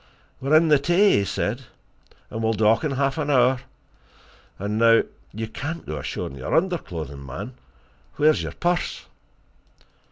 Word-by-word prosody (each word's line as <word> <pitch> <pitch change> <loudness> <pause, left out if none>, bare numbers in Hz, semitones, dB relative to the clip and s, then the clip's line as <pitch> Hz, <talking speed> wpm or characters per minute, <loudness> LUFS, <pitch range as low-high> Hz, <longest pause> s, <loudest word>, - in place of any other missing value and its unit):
"We're 140 +4 +2
in 160 0 +3
the 150 -2 +6
Tay," 175 +8 +4
he 100 - 0
said, 120 +7 -2 0.7
"and 110 - -4
we'll 110 0 +1
dock 110 +3 +3
in 150 -3 0
half 140 +3 0
an 150 -1 -1
hour. 130 -2 +4 1.0
And 105 +2 -2
now 115 0 +6 0.3
you 110 +1 -5
can't 150 +9 -6
go 75 -1 -4
ashore - - -4
in 70 - -8
your 65 - -2
underclothing, 85 - -2
man! 65 +4 -7
And - - -17 0.6
where's 155 +1 +4
your - - -5
purse?" 175 0 -1
130 Hz, 160 wpm, -24 LUFS, 105-155 Hz, 1.0 s, the